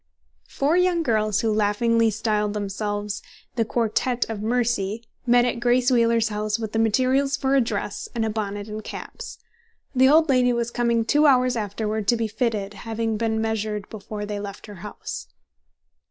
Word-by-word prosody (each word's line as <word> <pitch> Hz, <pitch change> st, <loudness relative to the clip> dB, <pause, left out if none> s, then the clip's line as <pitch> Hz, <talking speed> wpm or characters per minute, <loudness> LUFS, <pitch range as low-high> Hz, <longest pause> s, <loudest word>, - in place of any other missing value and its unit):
Four 295 Hz, +5 st, +1 dB
young 360 Hz, -2 st, +2 dB
girls, 215 Hz, -5 st, +1 dB
who 225 Hz, -1 st, +1 dB
laughingly 225 Hz, +2 st, +2 dB
styled 210 Hz, -1 st, -1 dB
themselves 205 Hz, 0 st, -3 dB, 0.3 s
"The 230 Hz, -, +2 dB
Quartette 235 Hz, +2 st, 0 dB
of 210 Hz, -2 st, -5 dB
Mercy," 225 Hz, -2 st, 0 dB, 0.2 s
met 245 Hz, 0 st, +5 dB
at 245 Hz, -, -1 dB
Grace 245 Hz, +2 st, +3 dB
Wheeler's 230 Hz, -2 st, +3 dB
house 210 Hz, 0 st, -1 dB
with 220 Hz, -1 st, -5 dB
materials 260 Hz, +5 st, +2 dB
for 270 Hz, -2 st, 0 dB
a 275 Hz, -, +5 dB
dress, 210 Hz, -3 st, -3 dB
and 225 Hz, -1 st, 0 dB
a -, -, 0 dB
bonnet 205 Hz, -1 st, -4 dB
and 215 Hz, 0 st, -6 dB
caps. 485 Hz, 0 st, -8 dB, 0.6 s
The 260 Hz, 0 st, +5 dB
old 315 Hz, +2 st, +5 dB
lady 250 Hz, -3 st, +3 dB
was 235 Hz, 0 st, -1 dB
coming 235 Hz, -1 st, +1 dB
two 295 Hz, +6 st, +4 dB
hours 255 Hz, -2 st, +4 dB
afterward 215 Hz, 0 st, -2 dB
to 235 Hz, -, +4 dB
be 225 Hz, -1 st, -1 dB
fitted, 210 Hz, -2 st, -2 dB
having 225 Hz, +1 st, -3 dB
being 220 Hz, 0 st, 0 dB
measured 215 Hz, -2 st, -2 dB
before 210 Hz, 0 st, -6 dB
they 205 Hz, 0 st, -4 dB
left 200 Hz, -1 st, -7 dB
her 205 Hz, -2 st, -10 dB
house. 210 Hz, 0 st, -7 dB
225 Hz, 170 wpm, -24 LUFS, 210-245 Hz, 0.6 s, met